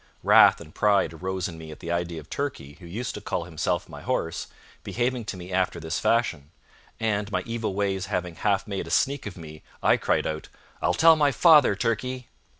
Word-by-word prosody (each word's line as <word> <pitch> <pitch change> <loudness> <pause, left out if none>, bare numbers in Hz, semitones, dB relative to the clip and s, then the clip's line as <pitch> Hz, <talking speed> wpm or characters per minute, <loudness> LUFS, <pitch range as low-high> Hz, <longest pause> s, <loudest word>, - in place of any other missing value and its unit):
Wrath - - +7
and 80 -2 -12
pride 100 -5 +2
arose 95 +2 -3
in 85 -3 -9
me 80 -1 -9
at 75 - -10
the 85 - -5
idea 85 -1 -2
of 75 - -13
Turkey, 135 - -4
who 85 - -11
used 115 +8 -4
to - - -7
call 85 - -2
himself 80 -3 -2
my - - -10
horse, 80 - -2 0.4
behaving 125 -1 -2
to 95 - -5
me 90 +1 -9
after 95 -2 0
this 80 -1 -3
fashion; 80 -12 0 0.5
and, 105 -2 -1
my 90 -2 -1
evil 115 -4 -3
ways 95 -2 -1
having 90 -3 -2
half 100 +5 0
made 100 -2 -4
a - - -7
sneak 140 -3 +1
of 95 - -8
me, 80 -2 -10 0.2
I - - +5
cried - - 0
out: 80 0 -4 0.3
"I'll 90 - +1
tell 165 - +7
my 145 -2 +3
father, 150 - +6
Turkey." 120 +3 -2
95 Hz, 205 wpm, -26 LUFS, 85-115 Hz, 0.5 s, Wrath